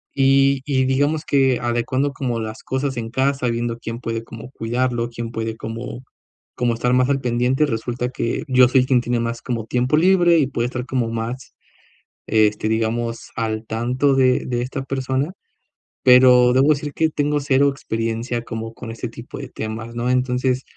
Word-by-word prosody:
Y 135 Hz, 0 st, +4 dB
y 135 Hz, -2 st, +1 dB
digamos 145 Hz, +4 st, +1 dB
que 135 Hz, -3 st, +2 dB
adecuando 120 Hz, +4 st, 0 dB
como 125 Hz, -4 st, -3 dB
las 110 Hz, 0 st, -6 dB
cosas 130 Hz, 0 st, -2 dB
en 115 Hz, -1 st, -4 dB
casa, 135 Hz, +1 st, 0 dB
viendo, 115 Hz, 0 st, -2 dB
¿quién 115 Hz, 0 st, -6 dB
puede 115 Hz, -1 st, -3 dB
como 115 Hz, +3 st, -10 dB
cuidarlo, 120 Hz, 0 st, -1 dB
quién 115 Hz, 0 st, -6 dB
puede 115 Hz, -1 st, -3 dB
como 115 Hz, +3 st, -7 dB, 0.5 s
como 120 Hz, -1 st, +1 dB
estar 125 Hz, +2 st, 0 dB
más 130 Hz, +1 st, +3 dB
al 135 Hz, -1 st, +1 dB
pendiente? 125 Hz, +4 st, +1 dB
Resulta 120 Hz, 0 st, -3 dB
que 120 Hz, +3 st, -2 dB
yo 130 Hz, -2 st, +6 dB
soy 130 Hz, 0 st, +3 dB
quien 130 Hz, -1 st, +3 dB
tiene 120 Hz, 0 st, -1 dB
más 115 Hz, 0 st, -3 dB
como 115 Hz, -3 st, -3 dB
tiempo 125 Hz, +5 st, +1 dB
libre 175 Hz, 0 st, +5 dB
y 140 Hz, -, +2 dB
puede 120 Hz, -3 st, -2 dB
estar 125 Hz, 0 st, -4 dB
como 125 Hz, -3 st, -1 dB
más, 115 Hz, +3 st, -5 dB, 0.7 s
este, 110 Hz, 0 st, +2 dB
digamos 115 Hz, +1 st, -2 dB
al 110 Hz, -1 st, -2 dB
tanto 125 Hz, +5 st, +1 dB
de 130 Hz, -1 st, +3 dB
de 120 Hz, -1 st, -1 dB
esta 130 Hz, +2 st, -4 dB
persona. 135 Hz, +3 st, -2 dB, 0.7 s
Pero 125 Hz, -1 st, +7 dB
debo 135 Hz, +3 st, +4 dB
decir 150 Hz, -1 st, +1 dB
que 160 Hz, -1 st, +1 dB
tengo 145 Hz, 0 st, 0 dB
cero 140 Hz, 0 st, +3 dB
experiencia 115 Hz, -2 st, -3 dB
como 115 Hz, 0 st, -6 dB
con 115 Hz, -1 st, -8 dB
este 115 Hz, +2 st, -5 dB
tipo 115 Hz, +1 st, -10 dB
de 135 Hz, -, -6 dB
temas, 110 Hz, +2 st, -6 dB
¿no? 120 Hz, +1 st, -1 dB
Entonces, 125 Hz, 0 st, 0 dB
125 Hz, 175 wpm, -21 LUFS, 115-135 Hz, 0.7 s, Pero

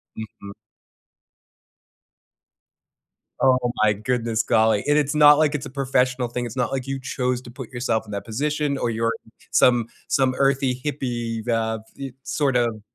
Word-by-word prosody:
Mhm. 105 Hz, -2 st, -9 dB, 2.9 s
Oh 130 Hz, -1 st, +5 dB, 0.3 s
my 105 Hz, -1 st, +4 dB
goodness, 115 Hz, +1 st, -1 dB
golly. 110 Hz, -2 st, +3 dB
And 145 Hz, +1 st, +4 dB
it's 145 Hz, 0 st, +1 dB
not 150 Hz, -1 st, +8 dB
like 150 Hz, -1 st, +2 dB
it's 140 Hz, -, -3 dB
a -, -, -7 dB
professional 125 Hz, -2 st, 0 dB
thing. 120 Hz, +1 st, -4 dB
It's 120 Hz, +2 st, -7 dB
not 125 Hz, -2 st, -1 dB
like 135 Hz, -1 st, -2 dB
you 135 Hz, 0 st, -3 dB
chose 125 Hz, -1 st, -2 dB
to 120 Hz, -, -11 dB
put 125 Hz, -1 st, -9 dB
yourself 120 Hz, -3 st, -1 dB
in 105 Hz, -, -11 dB
that 100 Hz, 0 st, -5 dB
position, 145 Hz, +4 st, -1 dB
or 120 Hz, -, -1 dB
you're 115 Hz, 0 st, 0 dB, 0.4 s
some 120 Hz, -2 st, +4 dB, 0.2 s
some 130 Hz, -2 st, +2 dB
earthy 135 Hz, -2 st, +1 dB
hippie, 120 Hz, -5 st, -3 dB
uh, 110 Hz, -1 st, 0 dB, 0.2 s
e 135 Hz, -2 st, -6 dB
sort 140 Hz, -4 st, 0 dB
of 115 Hz, -3 st, 0 dB
125 Hz, 160 wpm, -23 LUFS, 115-135 Hz, 2.9 s, not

